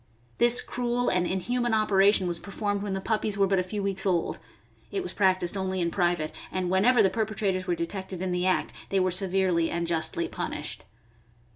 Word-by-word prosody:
This 240 Hz, 0 st, +4 dB
cruel 245 Hz, 0 st, -1 dB
and 180 Hz, -1 st, +1 dB
inhuman 240 Hz, +5 st, 0 dB
operation 200 Hz, -2 st, +4 dB
was 175 Hz, -1 st, -1 dB
performed 205 Hz, +1 st, -3 dB
when 200 Hz, -1 st, -3 dB
the 195 Hz, -, -1 dB
puppies 215 Hz, -1 st, 0 dB
were 200 Hz, -, +4 dB
but 195 Hz, -1 st, +2 dB
a -, -, +1 dB
few 200 Hz, +2 st, -4 dB
weeks 195 Hz, -1 st, 0 dB
old. 180 Hz, -4 st, 0 dB, 0.5 s
It 390 Hz, -, -2 dB
was -, -, -6 dB
practiced 185 Hz, -2 st, +2 dB
only 190 Hz, -1 st, -2 dB
in 170 Hz, -1 st, 0 dB
private, 175 Hz, -4 st, 0 dB, 0.2 s
and 185 Hz, -1 st, -2 dB
whenever 220 Hz, +5 st, +4 dB
the 190 Hz, -, +3 dB
perpe 220 Hz, -1 st, -2 dB
trators 190 Hz, -3 st, -1 dB
were 175 Hz, -1 st, 0 dB
detected 190 Hz, +2 st, -5 dB
in 185 Hz, 0 st, -2 dB
the 180 Hz, +1 st, 0 dB
act 185 Hz, -, 0 dB, 0.2 s
they 195 Hz, -, +2 dB
were 185 Hz, 0 st, +2 dB
severely 185 Hz, -2 st, +1 dB
and 170 Hz, 0 st, -2 dB
justly 165 Hz, 0 st, -1 dB
punished. -, -, -4 dB
190 Hz, 195 wpm, -27 LUFS, 180-205 Hz, 0.5 s, This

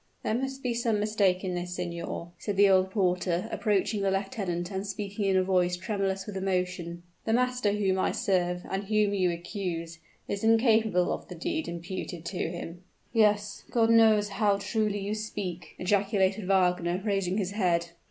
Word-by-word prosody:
"There -, -, 0 dB
must 265 Hz, +3 st, -3 dB
be 250 Hz, -2 st, 0 dB
some 230 Hz, -2 st, 0 dB
mistake 205 Hz, -3 st, +2 dB
in 185 Hz, -1 st, -2 dB
this, 180 Hz, 0 st, -4 dB
signor," 170 Hz, -1 st, -5 dB
said 205 Hz, -2 st, -3 dB
the 200 Hz, 0 st, +7 dB
old 190 Hz, -1 st, +4 dB
porter, 180 Hz, -1 st, 0 dB
approaching 205 Hz, 0 st, 0 dB
the 195 Hz, -, +2 dB
lieutenant 195 Hz, -3 st, -2 dB
and 195 Hz, +1 st, -3 dB
speaking 200 Hz, 0 st, -3 dB
in 190 Hz, -1 st, +3 dB
a 185 Hz, -, +4 dB
voice 180 Hz, -1 st, +2 dB
tremulous 195 Hz, -1 st, -2 dB
with 205 Hz, -, -7 dB
emotion. 180 Hz, -3 st, -2 dB, 0.2 s
"The 225 Hz, -, +1 dB
master 250 Hz, -3 st, +2 dB
whom 195 Hz, -2 st, +1 dB
I -, -, +2 dB
serve, 180 Hz, -5 st, 0 dB
and 195 Hz, +1 st, -2 dB
whom 210 Hz, 0 st, +2 dB
you 185 Hz, -3 st, +2 dB
accuse, 170 Hz, -2 st, -4 dB, 0.3 s
is 200 Hz, -, -3 dB
incapable 220 Hz, -5 st, +3 dB
of -, -, -6 dB
the 180 Hz, -, -8 dB
deed 315 Hz, -, -2 dB
imputed 170 Hz, 0 st, -6 dB
to 180 Hz, -2 st, -2 dB
him." 170 Hz, 0 st, -7 dB, 0.3 s
"Yes. 210 Hz, -2 st, +2 dB
God 230 Hz, -1 st, +3 dB
knows 220 Hz, -2 st, +5 dB
how 200 Hz, 0 st, +2 dB
truly 210 Hz, +1 st, -1 dB
you 200 Hz, +1 st, -3 dB
speak!" 205 Hz, -5 st, -5 dB
ejaculated 195 Hz, 0 st, +1 dB
Wagner, 180 Hz, -2 st, +2 dB
raising 195 Hz, -2 st, 0 dB
his 195 Hz, -3 st, -1 dB
head. 175 Hz, -4 st, +1 dB
195 Hz, 170 wpm, -28 LUFS, 180-210 Hz, 0.3 s, the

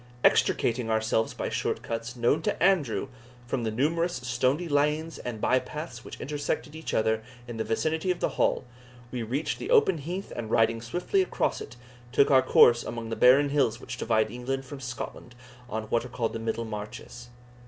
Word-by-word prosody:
Extricating 120 Hz, -1 st, +3 dB
ourselves 110 Hz, 0 st, +1 dB
by -, -, -3 dB
short -, -, -2 dB
cuts, 115 Hz, +2 st, -4 dB
known 120 Hz, +6 st, +2 dB
to 160 Hz, -, -1 dB
Andrew, 170 Hz, -, +2 dB, 0.4 s
from 120 Hz, +1 st, -2 dB
the 110 Hz, -, 0 dB
numerous 165 Hz, +9 st, 0 dB
stony 130 Hz, +6 st, 0 dB
lanes 150 Hz, +2 st, 0 dB
and 120 Hz, -3 st, -5 dB
by 130 Hz, +4 st, +3 dB
paths 150 Hz, -6 st, -7 dB
which -, -, -9 dB
intersected 145 Hz, +1 st, -3 dB
each 160 Hz, -, -5 dB
other 110 Hz, 0 st, +2 dB, 0.3 s
in 120 Hz, -1 st, -6 dB
the 110 Hz, -, -1 dB
vicinity 155 Hz, -, -1 dB
of 180 Hz, -, +1 dB
the -, -, +1 dB
Hall, -, -, +1 dB, 0.5 s
we 125 Hz, -, -3 dB
reached 135 Hz, +7 st, -2 dB
the -, -, -5 dB
open 435 Hz, -, +4 dB
heath 180 Hz, +7 st, -5 dB
and 115 Hz, -2 st, -5 dB
riding 115 Hz, 0 st, +2 dB
swiftly 175 Hz, -, 0 dB
across 375 Hz, -, -1 dB
it, -, -, -9 dB, 0.4 s
took 140 Hz, +3 st, +4 dB
our 130 Hz, -1 st, +7 dB
course 120 Hz, -2 st, +6 dB
among 115 Hz, -1 st, -5 dB
the 115 Hz, -, -2 dB
barren 135 Hz, +5 st, +6 dB
hills 130 Hz, -6 st, +1 dB
which 125 Hz, -, -7 dB
divide 110 Hz, -2 st, +1 dB
England 135 Hz, +3 st, -3 dB
from 140 Hz, +1 st, -8 dB
Scotland 120 Hz, -1 st, -7 dB, 0.3 s
on 110 Hz, 0 st, -3 dB
what 115 Hz, -, +2 dB
are 125 Hz, -, -8 dB
called 115 Hz, -2 st, -2 dB
the 115 Hz, -, -4 dB
Middle 115 Hz, +1 st, -2 dB
Marches. 110 Hz, +3 st, -8 dB
125 Hz, 185 wpm, -27 LUFS, 115-150 Hz, 0.5 s, our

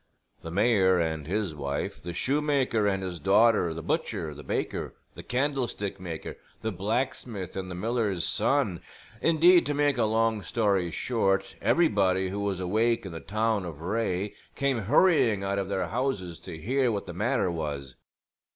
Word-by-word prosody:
The 85 Hz, -, -7 dB
mayor 95 Hz, -1 st, +3 dB
and 80 Hz, -3 st, -2 dB
his 100 Hz, -2 st, -1 dB
wife, 70 Hz, -1 st, -4 dB
the 85 Hz, -, -5 dB
shoemaker 135 Hz, -, +1 dB
and 95 Hz, -1 st, 0 dB
his 90 Hz, -2 st, -4 dB
daughter, 100 Hz, -1 st, +4 dB
the 80 Hz, 0 st, -6 dB
butcher, 80 Hz, -1 st, -2 dB
the 75 Hz, -, -10 dB
baker, 65 Hz, -, -3 dB, 0.2 s
the -, -, -9 dB
candlestick 125 Hz, -7 st, -2 dB
maker, 85 Hz, -3 st, -6 dB, 0.3 s
the 110 Hz, -, -1 dB
blacksmith 110 Hz, 0 st, -3 dB
and 95 Hz, -1 st, -4 dB
the 90 Hz, -, -5 dB
miller's 105 Hz, -3 st, -1 dB
son 120 Hz, -, +1 dB, 0.4 s
indeed, 170 Hz, +2 st, +6 dB
to 145 Hz, -, 0 dB
make 145 Hz, -3 st, +2 dB
a 115 Hz, -, +4 dB
long 110 Hz, 0 st, +1 dB
story 100 Hz, -5 st, +1 dB
short, 95 Hz, -1 st, 0 dB
everybody 95 Hz, -, +2 dB
who 100 Hz, +2 st, -4 dB
was 100 Hz, -2 st, -1 dB
awake 110 Hz, +5 st, +1 dB
in 95 Hz, -, -6 dB
the 80 Hz, -, -6 dB
town 110 Hz, +1 st, 0 dB
of 85 Hz, -4 st, -7 dB
Wraye 100 Hz, +1 st, -1 dB, 0.2 s
came 140 Hz, -3 st, +1 dB
hurrying 115 Hz, -, +3 dB
out 100 Hz, 0 st, -1 dB
of 95 Hz, -1 st, -3 dB
their 95 Hz, -1 st, 0 dB
houses 105 Hz, -9 st, -2 dB
to 80 Hz, -, -8 dB
hear 125 Hz, -, +1 dB
what 100 Hz, -2 st, -3 dB
the 90 Hz, -, -7 dB
matter 105 Hz, +1 st, 0 dB
was. 70 Hz, -5 st, -4 dB
100 Hz, 165 wpm, -27 LUFS, 90-120 Hz, 0.4 s, indeed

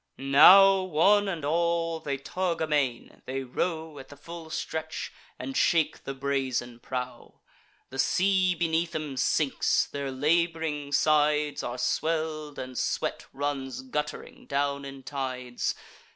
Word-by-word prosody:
Now, 190 Hz, +8 st, +7 dB
one 190 Hz, +4 st, +3 dB
and 170 Hz, -6 st, -3 dB
all, 165 Hz, +1 st, 0 dB
they 140 Hz, -3 st, -3 dB
tug 170 Hz, +5 st, -2 dB
amain; 145 Hz, -6 st, -1 dB
they 135 Hz, +1 st, -3 dB
row 160 Hz, +3 st, -3 dB
At 135 Hz, -, -12 dB
the 145 Hz, -, -12 dB
full 165 Hz, +2 st, -9 dB
stretch, 160 Hz, 0 st, -4 dB, 0.2 s
and 270 Hz, -, -6 dB
shake 170 Hz, -9 st, +2 dB
the 135 Hz, -, -4 dB
brazen 130 Hz, -3 st, -2 dB
prow. 125 Hz, 0 st, -6 dB, 0.5 s
The 135 Hz, -, -7 dB
sea 185 Hz, +3 st, +2 dB
beneath 165 Hz, 0 st, 0 dB
'em 150 Hz, -3 st, -3 dB
sinks; 135 Hz, +2 st, +1 dB
their 140 Hz, -1 st, -5 dB
lab'ring 155 Hz, +1 st, 0 dB
sides 150 Hz, 0 st, +2 dB
Are 120 Hz, +1 st, -4 dB
swell'd, 155 Hz, +3 st, -1 dB
and 130 Hz, 0 st, -5 dB
sweat -, -, -2 dB
runs 135 Hz, -2 st, -3 dB
gutt'ring 150 Hz, +3 st, -5 dB
down 140 Hz, 0 st, -1 dB
in 135 Hz, -1 st, -9 dB
tides. 130 Hz, -3 st, -3 dB
150 Hz, 130 wpm, -27 LUFS, 135-165 Hz, 0.5 s, Now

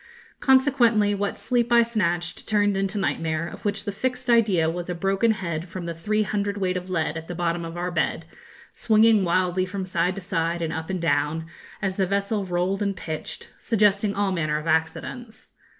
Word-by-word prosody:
Consequently, 245 Hz, -6 st, +4 dB
what 200 Hz, 0 st, -2 dB
sleep 240 Hz, -1 st, 0 dB
I 235 Hz, 0 st, +7 dB
snatched 175 Hz, -7 st, -2 dB
turned 205 Hz, -2 st, +2 dB
into 195 Hz, +1 st, -1 dB
nightmare, 165 Hz, -4 st, -1 dB
of -, -, -10 dB
which 205 Hz, -1 st, -1 dB
the 205 Hz, -, -2 dB
fixed 250 Hz, +3 st, -2 dB
idea 205 Hz, -9 st, +4 dB
was 175 Hz, +2 st, -3 dB
a 180 Hz, -, -2 dB
broken 195 Hz, +5 st, +1 dB
head 175 Hz, -5 st, -2 dB
from 180 Hz, 0 st, -6 dB
the 170 Hz, -, -3 dB
three 215 Hz, +6 st, 0 dB
hundredweight 200 Hz, -3 st, -1 dB
of 180 Hz, 0 st, -4 dB
lead 165 Hz, -3 st, -1 dB
at 160 Hz, 0 st, -7 dB
the 175 Hz, -, -5 dB
bottom 170 Hz, 0 st, -1 dB
of 165 Hz, +1 st, -6 dB
our 180 Hz, +1 st, -2 dB
bed, -, -, -1 dB, 0.5 s
swinging 220 Hz, -2 st, +4 dB
wildly 185 Hz, +1 st, +1 dB
from 185 Hz, +1 st, -4 dB
side 180 Hz, 0 st, 0 dB
to 195 Hz, -, -6 dB
side 170 Hz, -2 st, -1 dB
and 165 Hz, 0 st, -2 dB
up 160 Hz, +1 st, -5 dB
and 185 Hz, -3 st, -3 dB
down, 160 Hz, 0 st, +1 dB, 0.4 s
as 190 Hz, -1 st, -1 dB
the 190 Hz, -2 st, +2 dB
vessel 200 Hz, +1 st, -1 dB
rolled 180 Hz, +3 st, 0 dB
and 200 Hz, -2 st, -1 dB
pitched, 155 Hz, -1 st, -6 dB
suggesting 205 Hz, -2 st, +2 dB
all 200 Hz, -1 st, +1 dB
manner 155 Hz, -4 st, 0 dB
of 155 Hz, -, -6 dB
accidents. 165 Hz, +8 st, -2 dB
190 Hz, 190 wpm, -24 LUFS, 170-210 Hz, 0.5 s, I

